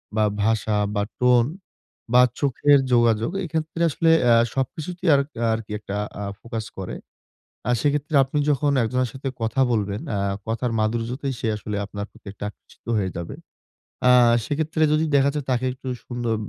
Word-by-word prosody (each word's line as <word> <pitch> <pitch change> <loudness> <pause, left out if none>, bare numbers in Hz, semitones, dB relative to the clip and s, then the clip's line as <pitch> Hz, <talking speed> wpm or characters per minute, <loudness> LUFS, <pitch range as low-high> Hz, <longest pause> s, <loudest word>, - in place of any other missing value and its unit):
বা 110 - +3 0.2
ভাষা 110 -1 +1 0.2
বা 100 - +1 0.2
tone 125 0 +4 0.6
বা 125 - +8 0.2
চোখের 140 +1 +4
যোগাযোগ 115 +2 +3
এক্ষেত্রে 160 0 -3
আসলে 165 +2 +1 0.2
আ - - +7 0.2
সবকিছুতেই 165 +7 -2
আর 140 - +4 0.3
আরকি 110 -1 -5
একটা 100 -1 -6 0.3
আ - - -3 0.2
ফোকাস 115 -2 -5
করে। 95 -1 -5 0.7
আর 125 - +3
সেক্ষেত্রে 150 +1 0
আপনি 135 +3 -4
যখন 145 0 +2
একজনের 125 +1 0
সাথে 135 +1 -6
কথা 115 +4 0
বলবেন, 105 -2 -1
আ - - 0 0.3
কথার 115 +2 -1
মাধুর্যতেই 120 +5 -1
সে - - -2
আসলে 105 0 -5
আপনার 100 0 -6
প্রতি - - -18
একটা 105 - -10
আকর্ষিত - - -22
হয়ে 95 -3 0
যাবে। 85 - -6 0.7
আ - - +7 0.3
সেক্ষেত্রে 155 +3 -1
যদি 155 +1 +3
দেখা 140 0 +4
যায় 150 - -3
তাকে 125 0 +1
একটু 130 +1 -9 0.2
সুন্দর 120 -2 -2
125 Hz, 160 wpm, -23 LUFS, 110-145 Hz, 0.7 s, বা